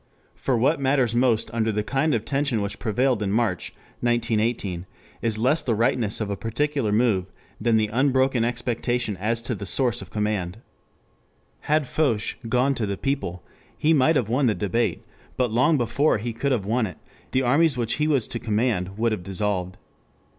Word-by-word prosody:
For 130 -3 -1
what 140 +7 +2
matters 135 -3 +2
most 120 -3 +2
under 110 -1 +1
the 105 0 -1
kind 135 +4 +1
of 110 -1 -2
tension 140 -3 0
which 100 0 -3
prevailed 125 +1 +1
in 100 -2 -1
March, 110 -4 0 0.3
1918, 115 -6 0 0.3
is 115 -2 0
less 130 +8 +2
the 115 - 0
rightness 115 -1 +1
of 105 -2 -2
a - - -1
particular 120 +3 -1
move 105 -4 +2 0.3
than 115 0 +3
the 110 - +3
unbroken 130 -1 +2
expectation 120 -1 -1
as 115 +4 -1
to 120 - -2
the 100 -2 -6
source 120 0 +2
of - - -10
command. 105 -3 -2 1.1
Had 155 -1 +3
Foch 125 -6 0 0.2
"gone 125 +4 +2
to 115 -5 -2
the 100 -1 -3
people" 135 - -3 0.3
he 160 +2 +3
might 155 +2 +4
have 120 -7 +1
won 125 +4 +2
the 110 - +2
debate, 110 +3 -1 0.3
but 125 -3 +1
long 130 +8 +3
before 130 +4 +2
he 115 +2 -4
could 140 +5 -1
have 115 -7 0
won 115 +2 +1
it, 90 - -10 0.3
the 130 - +1
armies 140 +3 +3
which 115 -1 -1
he 150 - +3
was 140 -7 +2
to 115 - -4
command 105 -4 -1
would 115 +1 +1
have 110 - -2
dissolved. 95 -1 -2
115 Hz, 180 wpm, -24 LUFS, 105-130 Hz, 1.1 s, might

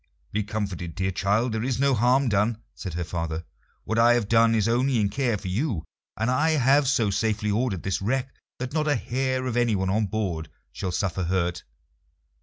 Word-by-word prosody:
"Be 105 - 0
comforted, 100 -5 -4
dear 95 0 -1
child; 105 +6 +1
there 110 0 -2
is 130 -1 -1
no 140 0 +3
harm 125 +4 +3
done," 105 +1 +1 0.2
said 90 -5 -6
her 90 - -1
father. 85 -1 -4 0.4
"What 110 +1 -1
I 120 +1 +6
have 115 -4 0
done 115 +1 +4
is 110 -1 +2
only 125 +2 +2
in 100 -2 +2
care 120 0 0
for 100 - -8
you, 100 - -1 0.3
and 115 +3 0
I 160 +5 +2
have 135 +2 +4
so 115 -6 +2
safely 105 +1 0
ordered 105 -4 -1
this 95 0 -1
wreck 130 +5 -1 0.2
that 130 +2 -5
not 155 -1 0
a 145 - +3
hair 130 +1 -1
of 125 -2 -2
anyone 105 -6 +1
on 105 +1 +1
board 90 -6 -3 0.2
shall 95 -2 -4
suffer 90 0 -1
hurt. 85 -1 -1
110 Hz, 200 wpm, -25 LUFS, 95-125 Hz, 0.4 s, I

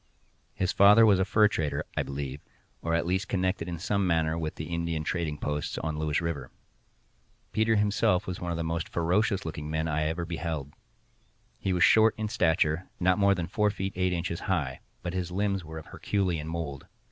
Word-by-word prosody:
His 95 0 0
father 105 +3 +7
was 100 -3 +5
a 95 - +2
fur 105 +1 +5
trader, 80 -8 -2
I - - +1
believe, 70 0 -5 0.4
or 85 0 0
at 85 - 0
least 95 +3 0
connected 95 -2 -1
in 85 -1 -4
some 100 +2 0
manner 80 -2 +2
with 80 -2 -3
the 80 - -5
Indian 85 -2 -1
trading 80 -2 -2
posts 75 0 -3
on 80 -1 -3
Lewis 75 0 0
river. 80 -7 -3 1.0
Peters 110 0 +2
himself 105 -1 +2
was 90 -2 -5
one 90 - -3
of 85 - -2
the 85 - -2
most 80 0 -2
ferocious 95 +4 +1
looking 75 -1 -5
men 80 +1 -1
I 75 0 0
ever 80 +2 -1
beheld. 80 -4 -4 0.9
He 95 - -1
was 90 -2 +3
short 110 0 +6
in 110 -1 -2
stature, 80 -2 +1
not 90 +2 +3
more 100 -1 +4
than 85 -2 -2
four 105 +2 +1
feet 95 -1 -3
eight 90 0 +1
inches 85 -1 -2
high, 65 0 -1 0.2
but 90 0 -3
his 90 -2 -2
limbs 100 0 -1
were 80 0 -8
of 80 - -8
Herculean 90 -6 -1
mould. 80 -4 -5
85 Hz, 195 wpm, -28 LUFS, 80-95 Hz, 1.0 s, father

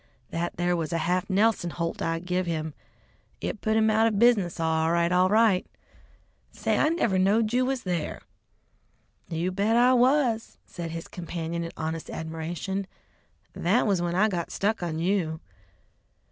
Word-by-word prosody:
"That 170 +1 -3
there 175 +1 +1
was 165 -1 -3
a 170 - 0
half 180 +3 0
Nelson 200 -2 +2
holt 165 0 -4
I 165 0 0
give 180 +1 -2
him. 160 -2 -2 0.7
It 215 - -4
put 220 0 +1
him 220 0 +4
out 220 +1 +4
of 215 -3 0
business 205 -7 +3
all 160 0 +1
right, 170 0 +2
all 180 +1 +4
right. 215 -3 +4 0.9
Say, - - -1
I 305 - +4
never 235 - +1
knowed 215 +4 +2
you 255 +1 +2
was 265 -2 -2
there!" 175 -4 -3 1.1
"You 170 +2 -1
bet 200 +4 +1
I 245 +2 +5
was," 250 -2 +2
said 170 -1 -6
his 165 0 -6
companion 170 -1 -4
in 165 - -5
honest 160 0 -4
admiration; 165 +4 -4 0.7
"that 200 +8 +2
was 195 -5 +1
when 175 0 -1
I 210 +4 +4
got 175 -5 -3
stuck 215 +2 -1
on 165 -2 -3
you!" 165 -2 0
180 Hz, 165 wpm, -26 LUFS, 165-220 Hz, 1.1 s, I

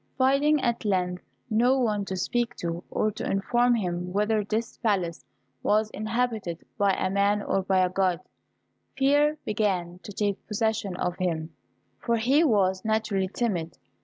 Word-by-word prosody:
Finding 275 +3 +3
at 235 -2 0
length 180 -3 0 0.2
no 245 +3 +3
one 210 -5 0
to 190 - -4
speak 240 +6 -1
to, 170 0 -4
or 215 - 0
to 210 - -7
inform 240 +5 +2
him 180 -4 -2
whether 210 +2 +1
this 220 +3 -3
palace 185 -7 0 0.4
was 215 +1 +2
inhabited 215 -6 -2
by 200 -1 +2
a 185 - 0
man 200 +1 +2
or 195 - 0
by 190 -1 +2
a - - -1
God, 185 -2 +1 0.8
fear 290 +3 +3
began 185 -5 -1
to 205 - -10
take 205 0 -2
possession 215 -3 -1
of 180 0 -2
him, 165 -3 -2 0.5
for 235 0 0
he 265 +8 +3
was 190 - +2
naturally 220 -3 0
timid. 175 - -2
210 Hz, 155 wpm, -26 LUFS, 185-235 Hz, 0.8 s, Finding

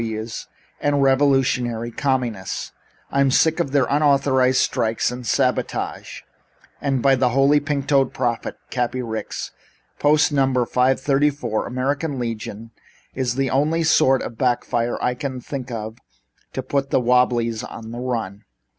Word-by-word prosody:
W.W.'s 110 0 -5 0.3
and 145 -1 +1
revolutionary 130 -4 +2
communists. 120 -7 -2 0.4
I'm 140 0 +3
sick 160 +5 +3
of 165 -6 -1
their 140 -2 +3
unauthorized 140 -3 +3
strikes 115 -2 +1
and 125 -1 -7
sabotage, - - -1 0.6
and 135 -3 0
by 135 - +5
the 125 -1 +2
Holy 135 +4 +4
Pink 145 -1 -2
Toed 135 -2 +2
Prophet, 120 -2 -2
Cappy 125 0 -1
Ricks 110 -2 -5 0.5
Post. 150 +1 +4
No. 140 -2 +3 0.2
534, 135 -1 +1
American 140 +4 -2
Legion, 115 -2 -5 0.4
is 125 -2 -1
the 135 0 0
only 155 +5 +1
sort 135 -4 +4
of 115 - -7
back 125 -2 +1
fire 120 0 -1
I 125 - +1
can 130 0 -5
think 130 0 -6
of 110 -1 -6 0.5
to 130 - -3
put 135 +1 -1
the - - +3
Wobblies 120 -2 +2
on 110 0 -8
the 120 - -6
run." 115 -6 -4
130 Hz, 140 wpm, -22 LUFS, 120-140 Hz, 0.6 s, by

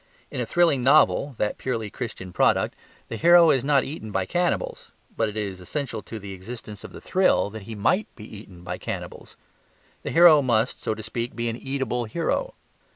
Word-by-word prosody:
In - - -3
a 120 - -3
thrilling 170 -7 +3
novel 140 0 +4
(that 105 -1 -1
purely 115 -5 -3
Christian 100 -7 -7
product) - - +2 0.3
the 115 - -5
hero 170 +1 +7
is 130 - +1
not 140 -1 +3
eaten 135 -7 -7
by 95 -2 -1
cannibals; 175 - -2 0.3
but 110 -1 0
it 105 - -8
is 100 -3 -4
essential 120 - -4
to 115 - -8
the 100 -2 -8
existence 105 +2 -9
of - - -9
the - - -10
thrill 185 - +2
that 110 0 -8
he 110 - -5
MIGHT 180 - +1
be 105 - -11
eaten 100 -5 -12
by 90 0 -5
cannibals. - - -7 0.6
The - - -5
hero 165 -3 +7
must 120 -2 0
(so 110 - -2
to 110 - -8
speak) 115 +2 -4
be 115 0 -2
an 115 - -3
eatable 130 -2 -3
hero. 170 - -2
115 Hz, 195 wpm, -24 LUFS, 105-140 Hz, 0.6 s, hero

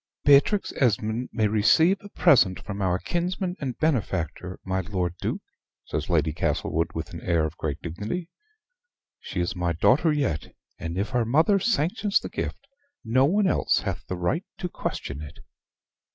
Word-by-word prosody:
"Beatrix 145 +8 +4
Esmond 115 -1 +1
may 110 -2 +1
receive 160 - +4
a 205 - -11
present 95 - +4
from 100 0 -5
our 90 -2 +2
kinsman 180 - -2
and 130 -4 -4
benefactor, 95 - -1
my 95 0 0
Lord 90 -2 -2
Duke," - - -2 0.4
says 75 - -3
Lady 80 -3 +2
Castlewood, 80 +1 0
with 80 0 -5
an 85 - -7
air 85 -2 +1
of 80 - -5
great - - -3
dignity. 105 - -4 0.9
"She 90 - -4
is 85 - -2
my 90 -1 0
daughter 130 - +3
yet: 135 - -2 0.2
and 85 +2 -4
if 100 +2 -1
her 120 +1 +1
mother 160 - +3
sanctions 195 0 +1
the - - -7
gift - - -5 0.4
no 130 +4 +4
one 200 +7 +2
else 185 - +2
hath - - -4
the 90 - -3
right 90 - 0
to 180 - -3
question 70 - -4
it." 75 - -9
110 Hz, 165 wpm, -26 LUFS, -, 0.9 s, Beatrix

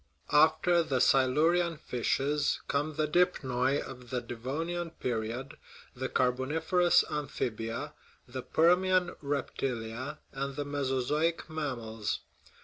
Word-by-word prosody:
After 160 +3 +5
the 135 -5 0
Silurian 160 +7 +3
fishes 140 +4 0
come 145 +2 -1
the 155 0 +1
dipnoi 140 -5 +2
of 125 -2 -8
the 125 - -1
Devon 125 +7 -4
ian 175 -1 -3
period 120 -2 -4 0.4
the 130 +1 -3
Carboniferous 160 +8 +3
amphibia, 130 -2 -3 0.3
the 130 +1 -5
Permian 180 +5 +3
reptilia, 130 -4 -3 0.2
and 135 0 -3
the 145 0 -3
Mesozoic 145 +4 0
mammals. 120 -8 -3
140 Hz, 105 wpm, -30 LUFS, 125-160 Hz, 0.4 s, After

